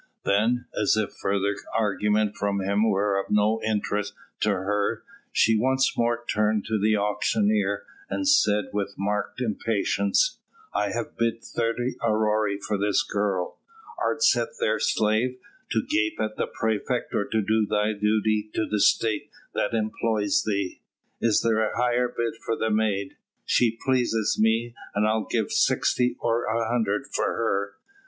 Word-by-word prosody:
Then, 115 +5 +2
as 105 +1 +2
if 110 -2 -1
further 100 +1 +1 0.2
argument 105 0 +1
from 100 -1 -1
him 100 +3 +1
were 100 0 +1
of 100 - -4
no 105 +2 +2
interest 105 -1 -1 0.2
to 105 - +1
her, 100 +3 -1 0.3
she 115 - +4
once 130 +4 +2
more 120 0 0
turned 105 0 +1
to 110 -1 -1
the 110 +2 +3
auctioneer, 210 - +1 0.3
and 290 - -2
said 105 - +3
with 100 -1 -2
marked 105 +5 -2
impatience: 125 - +1 0.3
"I 105 - 0
have 115 +3 -5
bid 115 0 0
thirty 120 +2 -2
aurei 110 -2 +1
for 100 0 -2
this 105 +7 +2
girl; 100 -8 -2 0.4
art 450 - 0
set - - +4
there 475 - +1
slave, 110 +4 +1 0.3
to 110 - 0
gape 110 0 0
at 110 0 -2
the - - -1
praefect, 110 +3 -2
or 100 - +1
to 110 - -1
do 110 +1 +1
thy 105 +1 +1
duty 105 0 +1
to 110 - +1
the 105 - -1
State 110 +1 +2 0.2
that 115 - -1
employs 110 -1 0
thee? 100 -3 -2 0.4
Is 115 -2 +3
there 115 -1 +2
a 110 - -1
higher 125 0 +2
bid 120 -1 -3
for 115 - -1
the 110 0 -1
maid? 105 -3 0 0.3
She 115 -2 +2
pleaseth 120 -5 +1
me, 115 +2 +2 0.2
and 105 +1 +2
I'll 110 -2 0
give - - 0
sixty 125 0 +2
or 115 0 0
an 115 0 0
hundred 110 0 0
for - - +1
her. 100 -3 -1
110 Hz, 155 wpm, -25 LUFS, 105-115 Hz, 0.4 s, she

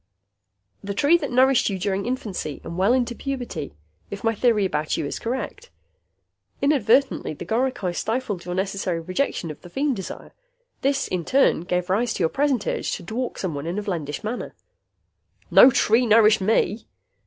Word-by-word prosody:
"The 200 0 -4
tree 290 +10 +4
that - - -4
nourished 260 0 +4
you 195 - -2
during 195 +2 -2
infancy, 215 - -4
and 170 - -7
well 190 +5 +2
into 245 -1 +1
puberty, 240 - -5 0.3
if 200 - -7
my 225 0 +2
theory 220 -2 +2
about 155 -4 -1
you 160 - -2
is - - -4
correct. 260 - -4 0.9
Inadvertently, 270 - +2
the - - -8
goricae 230 -6 -1
stifled 220 -3 -2
your 180 0 -4
necessary 190 -2 -2
rejection 185 - -2
of 150 - -12
the 175 - -12
feem 275 +8 0
desire. 190 -6 -7 0.5
This 275 0 +1
in 180 -2 -2
turn 265 - +3
gave 180 -1 -1
rise 230 +4 +1
to 185 - -1
your 160 - +3
present 270 - 0
urge - - -2
to - - -5
dwark 235 +8 -4
someone 160 -5 -4
in 175 +4 -3
a 210 - -2
vlendish 160 -8 -4
manner." 225 +4 -5 1.0
"No 255 - +9
tree 235 -1 +3
nourished 215 -1 +5
me." 215 +1 +1
210 Hz, 170 wpm, -23 LUFS, 180-255 Hz, 1.0 s, No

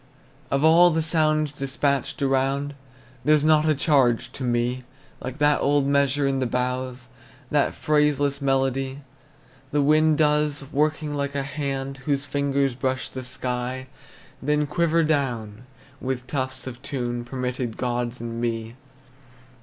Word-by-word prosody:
Of 140 +1 +1
all 170 +3 +7
the 160 -1 0
sounds 155 -2 +2
despatched 140 -1 -1
abroad, 135 +1 +1 0.5
There's 150 +1 +4
not 155 0 +4
a 155 - +3
charge 130 -5 +2
to 130 - -7
me 120 +1 0 0.4
Like 130 +1 -6
that 150 -1 +3
old 145 0 +3
measure 140 0 +2
in 135 -1 +1
the 130 - 0
boughs, 125 +1 -2 0.4
That - - +2
phraseless 150 -2 +1
melody 135 0 0 0.7
The 145 0 +1
wind 155 +1 +4
does, 150 -2 +2
working 150 +1 0
like 140 -1 -2
a 140 - 0
hand 135 -1 -4
Whose 140 -1 0
fingers 140 -1 0
brush 130 +1 -2
the 130 - -6
sky, 125 0 -3 0.6
Then 150 +2 +1
quiver 165 +2 +2
down, 125 -7 -1 0.3
with 130 -1 -3
tufts 130 -1 -3
of 130 -1 -8
tune 120 -4 -3
Permitted 125 -2 -3
gods 120 -1 -2
and 115 0 -5
me. 115 -1 -2
135 Hz, 140 wpm, -24 LUFS, 125-150 Hz, 0.7 s, all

